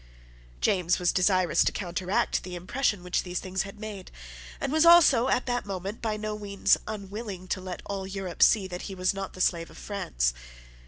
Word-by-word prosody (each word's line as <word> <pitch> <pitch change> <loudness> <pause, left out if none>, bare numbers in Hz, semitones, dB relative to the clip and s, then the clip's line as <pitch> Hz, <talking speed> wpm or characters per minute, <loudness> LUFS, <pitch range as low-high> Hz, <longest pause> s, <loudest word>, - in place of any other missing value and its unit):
James 180 -3 +2
was 180 -1 +2
desirous 185 -3 +3
to - - +1
counteract 185 0 -1
the 180 -1 -7
impression 205 +2 -1
which 180 0 0
these 180 -1 -4
things 190 0 -2
had 195 +1 -7
made, 210 -4 -7 0.5
and 270 - -2
was 315 0 +4
also 330 -8 +7
at 255 -1 +1
that 245 -1 -1
moment 195 +2 -5
by 220 -2 -1
no 215 0 -4
means 200 -1 +2
unwilling 200 -2 -6
to 185 - -2
let 185 -1 -7
all 195 -1 -4
Europe 190 -3 -6
see 210 -4 +6
that 180 -1 -6
he 195 - -6
was 185 +1 +1
not 195 -1 -5
the 185 - -6
slave 170 -2 +1
of - - -15
France. 60 - -1
195 Hz, 195 wpm, -27 LUFS, 180-210 Hz, 0.5 s, also